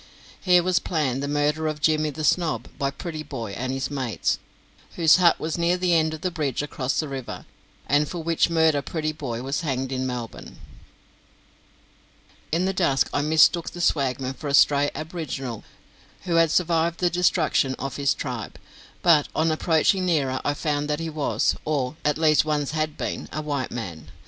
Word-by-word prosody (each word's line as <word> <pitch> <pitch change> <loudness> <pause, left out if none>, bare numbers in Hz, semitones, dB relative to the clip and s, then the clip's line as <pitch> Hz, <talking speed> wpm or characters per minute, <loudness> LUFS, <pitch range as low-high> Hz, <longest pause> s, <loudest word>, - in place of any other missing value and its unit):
Here 180 -2 +4
was 185 0 +2
planned 140 -6 -1
the 140 - -2
murder 150 +2 0
of 155 -1 -3
Jimmy 155 0 +2
the 155 +2 -6
Snob 165 0 +1
by 140 - +1
Prettyboy 140 - -6
and 130 +3 -3
his 135 +1 -3
mates, 130 -6 -1 0.6
whose 165 -1 +6
hut 175 -2 +4
was 160 +2 -3
near 170 +1 +2
the 180 -1 +1
end 160 -1 +2
of 155 - -12
the 185 - -1
bridge 145 -5 -2
across 135 -2 -2
the 155 - -1
river, 135 -3 -6 0.4
and 145 +1 +2
for 175 -2 -5
which 165 0 +2
murder 160 -3 +3
Prettyboy 150 -6 -4
was 135 +5 -2
hanged 135 -4 -2
in 130 0 -1
Melbourne. 120 -3 -6 1.9
In 170 +4 +1
the 190 - 0
dusk 140 -8 +1
I 145 - +1
mistook 160 +3 +4
the 175 - -10
swagman 135 -5 0
for 145 - -8
a 140 - +2
stray 145 0 +5
aboriginal 150 - -5 0.6
who 170 -2 0
had 165 -1 +5
survived 170 0 +1
the 180 -1 +2
destruction 170 -6 +2
of 135 -1 -5
his 140 -1 +1
tribe, 125 -7 -5 0.5
but 160 -4 +5
on 160 +1 +2
approaching 165 +4 +2
nearer, 135 -6 +1
I 145 - 0
found 145 0 -1
that 150 +1 0
he 165 -1 -4
was, 150 -2 0
or 145 -2 -1
at 150 0 +1
least 155 -1 +4
once 150 -2 -1
had 155 -1 -2
been, - - -4
a 155 - -4
white 145 -3 -2
man. 85 -10 -6
150 Hz, 180 wpm, -24 LUFS, 135-165 Hz, 1.9 s, whose